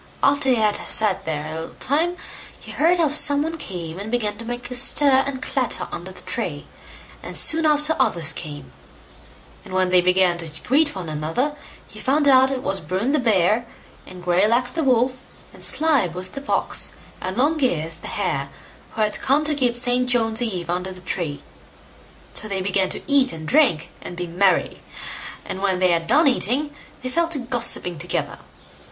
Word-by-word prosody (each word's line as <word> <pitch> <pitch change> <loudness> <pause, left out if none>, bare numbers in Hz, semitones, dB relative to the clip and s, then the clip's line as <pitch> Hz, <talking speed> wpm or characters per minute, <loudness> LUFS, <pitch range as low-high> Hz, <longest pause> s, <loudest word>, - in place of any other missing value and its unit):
After 285 -1 +2
he 255 - +4
had 215 -2 +1
sat 210 -3 +1
there 150 -2 -3
a 155 - -6
little 165 - -10
time, 330 +6 0 0.4
he - - -11
heard 335 +4 +2
how 325 -3 +2
some 290 0 +4
one 325 +1 -5
came 175 - -6
and 205 +2 -6
began 220 -3 -1
to 230 - -7
make 245 +1 -6
a - - -3
stir 270 +1 +5
and 265 -2 -5
clatter - - 0
under - - -7
the - - -14
tree, - - -4 0.6
and - - -4
soon 320 0 +5
after 300 +1 +2
others 165 -2 +2
came; 145 -3 -8 0.9
and 185 - -8
when 185 -1 +2
they 180 0 +5
began 180 -1 +3
to 165 -2 -3
greet 290 +1 +2
one 185 -3 -6
another, 160 - -2 0.3
he - - -13
found 285 +2 +1
out 265 -1 +6
it 265 -1 -4
was 195 - +1
Bruin 185 - -2
the 300 - +2
bear, 220 0 +1 0.4
and 180 -1 -11
Greylegs 215 +8 +2
the 325 +4 -2
wolf, 255 0 +1 0.3
and - - -15
Slyboots 185 - 0
the 275 - -7
fox, 280 - +1 0.3
and 185 +3 -5
Longears 250 - +1
the - - -9
hare - - -3 0.4
who 220 - -3
had 210 -1 0
come 275 +3 +2
to 305 - 0
keep 250 -4 0
St. 250 0 +2
John's 225 -1 +2
eve 190 -7 -3
under 180 +2 -3
the 185 -1 -12
tree. 170 -5 -4 0.9
So 215 - 0
they 195 -2 -3
began 190 -1 +1
to - - -2
eat 280 -3 +4
and 160 -1 -8
drink, 275 - +2
and 175 - -9
be 180 - -3
merry; 180 +3 0 0.6
and 190 - -6
when 195 -2 0
they 185 -1 +2
had 165 -1 0
done 320 - +4
eating, 275 +3 +1 0.3
they 255 - -3
fell 335 +5 0
to 330 -3 +1
gossipping 240 - +1
together. - - -3
230 Hz, 185 wpm, -21 LUFS, 180-275 Hz, 0.9 s, out